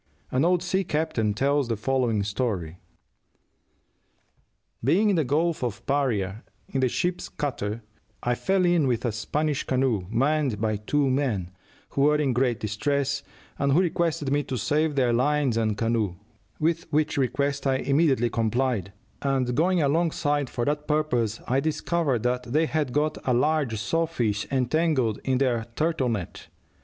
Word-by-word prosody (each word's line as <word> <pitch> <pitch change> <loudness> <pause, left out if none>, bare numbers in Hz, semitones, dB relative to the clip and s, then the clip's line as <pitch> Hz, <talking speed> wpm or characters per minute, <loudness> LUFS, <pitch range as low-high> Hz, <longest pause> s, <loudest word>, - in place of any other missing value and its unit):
An 130 +3 +2
old 175 +1 +2
sea 190 +2 0
captain 150 - -1
tells 140 +2 +1
the 115 -2 -1
following 120 -3 +1
story: 100 -6 -2 2.0
"Being 190 - +3
in - - +2
the 160 - +2
Gulf 155 +2 0
of 120 -5 -4
Paria, 115 -7 0 0.2
in 135 - -2
the 130 -1 +2
ship's 180 +6 -2
cutter, 115 -6 -3 0.4
I 120 - +1
fell 190 +8 +1
in 175 -5 +3
with 120 -1 0
a 120 - +1
Spanish 145 +7 -1
canoe, 125 -8 0
manned 135 0 +1
by 110 -1 0
two 140 +7 0
men, 115 -10 -1 0.4
who 140 - -1
were 150 +2 +5
in 145 -4 +1
great 120 -1 +1
distress, 140 +6 -1 0.4
and 140 -1 +2
who 160 - +5
requested 165 -5 0
me 145 +1 +2
to 130 - -3
save 150 +5 +1
their 125 -3 +2
lines 140 0 +2
and 110 -2 0
canoe, 115 -5 0 0.4
with 165 +1 -1
which 150 -1 +1
request 140 +2 0
I 135 - +3
immediately 135 -3 +2
complied, 115 -3 0 0.3
and 135 -3 0
going 170 +4 +2
alongside 145 -2 +1
for 120 - -2
that 150 +1 -1
purpose, 125 -8 0
I 130 +2 +2
discovered 150 -4 0
that 125 0 -1
they 155 +4 +3
had 150 -4 -1
got 150 +3 0
a 125 - +1
large 140 -4 +1
saw 165 +9 0
fish 105 -9 -1
entangled 130 -3 +1
in 130 -1 +1
their 120 -4 0
turtle 155 -5 0
net. 105 -7 -4
135 Hz, 160 wpm, -26 LUFS, 115-150 Hz, 2.0 s, were